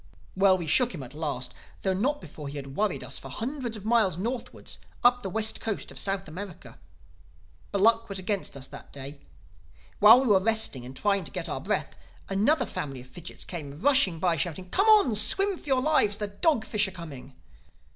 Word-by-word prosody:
"Well, 190 -1 +5
we 175 - -3
shook 235 - +2
him 145 - -6
at 125 +1 -10
last—though 150 +5 -4
not 275 +10 0
before 150 -2 -9
he 140 +1 -6
had 135 -1 -7
worried 210 -2 0
us - - -4
for - - -10
hundreds 245 -1 -4
of 205 - -11
miles 220 -7 +3
northward, 235 +6 -5 0.3
up 245 0 +5
the 195 - -4
west 220 +3 +1
coast 220 -3 -3
of - - -9
South 195 -2 -1
America. 180 +2 -9 0.9
But 200 - -1
luck 230 +1 +4
was 195 - -3
against 190 -5 -3
us 130 0 -6
that - - -11
day. 140 +1 -8 0.8
While 225 +5 +9
we - - -1
were 200 -3 +5
resting 220 - +1
and 130 +1 -9
trying 200 -2 +1
to - - -7
get - - -3
our - - -4
breath, - - -2 0.3
another 245 +9 +2
family 135 - -5
of 125 - -14
fidgits 170 +4 -9
came 150 -5 -7
rushing 260 -8 +3
by, 170 0 +1
shouting, 180 +4 -3
'Come 395 +3 +3
on! 415 - +6
Swim 390 - +4
for - - -15
your 265 -3 +2
lives! 240 -10 +3
The 210 -1 -3
dog 230 +3 +1
fish 210 -1 +2
are - - -4
coming! 145 -7 -10
200 Hz, 200 wpm, -27 LUFS, 165-230 Hz, 0.9 s, While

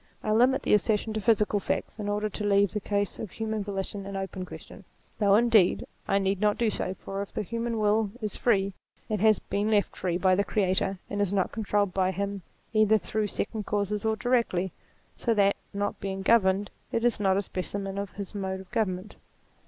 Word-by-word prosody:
I 215 - 0
limit 250 +5 +4
the - - +2
assertion 210 +1 +2
to 215 - -2
physical 210 -1 +3
facts, 200 - -3
in 205 -1 -2
order 210 +1 0
to 210 0 -5
leave 200 -1 +3
the 210 - -2
case 205 -1 -1
of 215 - -5
human 220 +1 -3
volition 195 0 -4
an 200 - -6
open 190 -1 -4
question: - - -11 0.4
though 200 -2 +5
indeed 220 -5 +4 0.2
I 195 - +3
need 195 0 0
not 210 -1 +3
do 230 -2 +2
so, 185 - -3
for 195 +1 -5
if 200 - -6
the - - -2
human 230 +2 -2
will 210 0 +2
is 215 -4 -3
free, 200 -5 +2 0.4
it 215 -2 0
has 215 +1 +5
been 205 +2 -2
left 205 -3 +2
free 175 -2 -1
by 185 0 +3
the 200 +2 +3
Creator, 195 -1 0
and 205 0 -2
is 200 -2 +1
not 195 -2 +1
controlled 205 -3 0
by 185 -1 +2
him 200 +1 -3 0.3
either 215 0 +5
through 215 +1 -2
second 210 +1 -3
causes 205 0 -1
or 220 0 +1
directly, 225 -7 +1 0.4
so 230 -2 0
that, 200 -1 +4 0.2
not 205 0 -2
being 195 0 -4
governed, 200 -2 +3 0.2
it 230 +1 0
is 240 -3 +2
not 190 -2 +3
a 200 - 0
spe 185 - -6
cimen 195 +1 -4
of 200 - -7
his 200 0 -6
mode 190 -2 -3
of 190 - -16
government. 210 -4 -2
205 Hz, 210 wpm, -28 LUFS, 195-215 Hz, 0.4 s, though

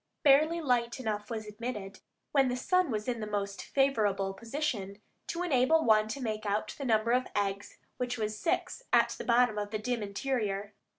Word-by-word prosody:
Barely 305 +4 +5
light 245 -4 +1
enough 215 -3 -3
was 220 -2 -4
admitted, 210 -2 -6 0.3
when 275 -2 +4
the 250 0 -1
sun 365 +5 +2
was 215 -1 -2
in 240 -2 -1
the 215 - -4
most 200 -1 -3
favorable 210 -8 +1
position, 225 -3 -3 0.3
to 340 +1 -2
enable 315 0 +3
one 215 -1 +5
to 225 +6 -5
make 215 -4 -3
out 210 +1 -1
the 280 - -3
number 225 -1 +2
of 255 +1 +2
eggs, 200 0 -2 0.2
which 250 0 -2
was 215 -1 -2
six, 330 - -1
at - - +5
the - - -6
bottom 235 -3 +3
of 205 0 -3
the 215 - -2
dim 235 +2 -2
interior. 205 -1 -2
225 Hz, 185 wpm, -30 LUFS, 210-255 Hz, 0.3 s, Barely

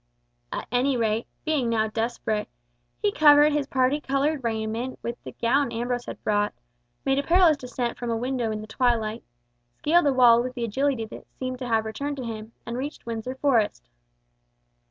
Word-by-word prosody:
At - - -4
any 250 +2 +2
rate, 225 0 0 0.2
being 295 -7 +1
now 220 -1 +2
desperate, 220 -1 -2 0.5
he 205 - +3
covered 295 +3 +6
his 290 -2 0
parti 265 +3 +1
coloured 275 +1 0
raiment 225 +2 -2
with 235 +1 -5
the - - -8
gown 245 +2 +1
Ambrose 240 +1 -2
had - - -8
brought, 205 - +1 0.5
made 270 0 +2
a - - -1
perilous 340 0 +5
descent 250 -3 -4
from 240 - -3
a 230 - 0
window 245 -1 -1
in 215 -1 -3
the - - -7
twilight, 225 -1 0 0.5
scaled 335 +1 +3
a 280 - +3
wall 240 -2 +6
with 255 +1 -5
the 240 -2 -2
agility 255 +1 0
that 220 - -11
seemed 255 -1 -4
to 255 - -4
have 225 -2 +1
returned 280 +6 -4
to 260 - -5
him, 220 -1 -6
and 235 +1 -4
reached 285 +3 -6
Windsor 230 +2 -4
Forest. 240 - +1
245 Hz, 180 wpm, -25 LUFS, 225-275 Hz, 0.5 s, covered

